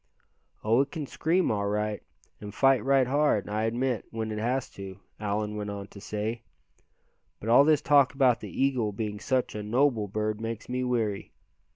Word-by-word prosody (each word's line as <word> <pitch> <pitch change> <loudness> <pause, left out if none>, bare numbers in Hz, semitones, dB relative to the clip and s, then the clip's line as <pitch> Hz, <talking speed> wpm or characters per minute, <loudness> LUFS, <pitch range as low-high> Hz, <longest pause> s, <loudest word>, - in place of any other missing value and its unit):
"Oh! 115 +4 +4
it 140 - -1
can 155 -1 -5
scream, 170 +6 +1
all 100 -1 -1
right, 105 0 -1 0.4
and 105 -1 -7
fight 135 -4 +4
right 135 0 +4
hard, 135 -7 +1
I 105 +1 -1
admit, 120 +1 -1
when 110 -1 -4
it 105 - -3
has 125 +4 -1
to," 95 -1 -9 0.2
Allan 105 0 -2
went 105 0 -4
on 100 -1 -6
to 100 - -12
say, 110 +3 -3 1.0
"but 110 - -5
all 125 +4 +7
this 150 -1 +3
talk 140 -2 +5
about 130 -4 +4
the - - -8
eagle 130 -6 0
being 105 0 -4
such 130 +1 0
a 105 - -4
noble 115 0 +1
bird 110 +2 -2
makes 115 -1 -5
me 125 +1 -2
weary. 115 -5 -2
115 Hz, 185 wpm, -28 LUFS, 105-130 Hz, 1.0 s, all